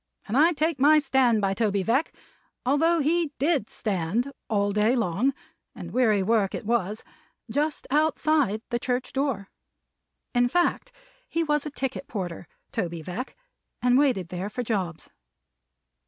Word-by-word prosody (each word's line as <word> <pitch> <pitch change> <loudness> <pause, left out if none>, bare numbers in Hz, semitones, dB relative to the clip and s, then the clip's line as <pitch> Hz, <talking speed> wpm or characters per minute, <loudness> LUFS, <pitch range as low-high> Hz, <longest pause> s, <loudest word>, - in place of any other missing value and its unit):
And 215 - -2
I 315 +5 +6
take 315 -1 0
my 300 +3 +6
stand 260 -7 +3
by 195 -1 +1
Toby 200 -2 0
Veck, 260 - +1 0.5
although 320 +5 +3
he 320 +1 +1
did 285 -5 +1
stand 210 +6 -1 0.2
all 205 -1 +1
day 210 +4 +2
long 230 +3 +1 0.4
(and - - -8
weary 220 -6 +3
work 210 -1 +1
it - - -6
was) 215 -2 -1 0.5
just 300 +1 -1
outside 300 -6 +2
the 240 - 0
church 250 +1 -2
door. 265 -8 -2 0.8
In 245 0 +3
fact 355 - +1 0.4
he 330 - 0
was 295 -1 0
a - - -3
ticket 270 -1 -4
porter, 180 - -5 0.2
Toby 170 -2 -3
Veck, 200 - -6 0.4
and 250 0 +3
waited 255 - +2
there 180 +3 -4
for 245 +4 -4
jobs. 190 -8 -3
245 Hz, 145 wpm, -26 LUFS, 205-290 Hz, 0.8 s, I